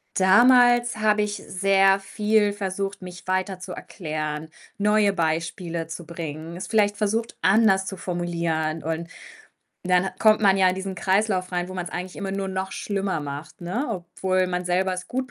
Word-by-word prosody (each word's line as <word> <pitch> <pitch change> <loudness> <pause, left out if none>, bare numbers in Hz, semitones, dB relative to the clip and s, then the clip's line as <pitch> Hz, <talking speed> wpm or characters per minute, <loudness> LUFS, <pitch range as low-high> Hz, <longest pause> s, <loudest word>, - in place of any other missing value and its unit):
Damals 240 +5 +5
habe 215 -1 +2
ich 210 0 -1
sehr 195 0 +3
viel 210 +1 +1
versucht, 195 0 -4
mich 180 -1 -10
weiter 185 0 -1
zu 185 0 -8
erklären, 155 -3 -5 0.3
neue 210 -1 +3
Beispiele 165 0 -2
zu 165 +1 -7
bringen, 165 0 -6
es 185 - -5
vielleicht 205 -1 +2
versucht, 225 +2 -1
anders 195 -1 +4
zu 195 -1 -5
formulieren 170 -3 -2
und 165 +1 -3 0.8
dann 180 0 +3
hat - - -7
kommt 215 -1 +5
man 195 -2 +5
ja 190 -1 +5
in 180 - +1
diesen 190 0 -5
Kreislauf 190 0 0
rein, 175 0 -1
wo - - -7
man's 180 -1 -4
eigentlich 180 0 -6
immer 195 -1 -4
nur 195 0 -2
noch 190 0 -3
schlimmer 195 -4 -2
macht, 145 +4 -7
ne? 210 +12 -2
Obwohl 185 -1 -1
man 180 0 -2
selber 185 +1 +1
es 185 0 -6
gut 255 0 -3
190 Hz, 175 wpm, -24 LUFS, 175-205 Hz, 0.8 s, Damals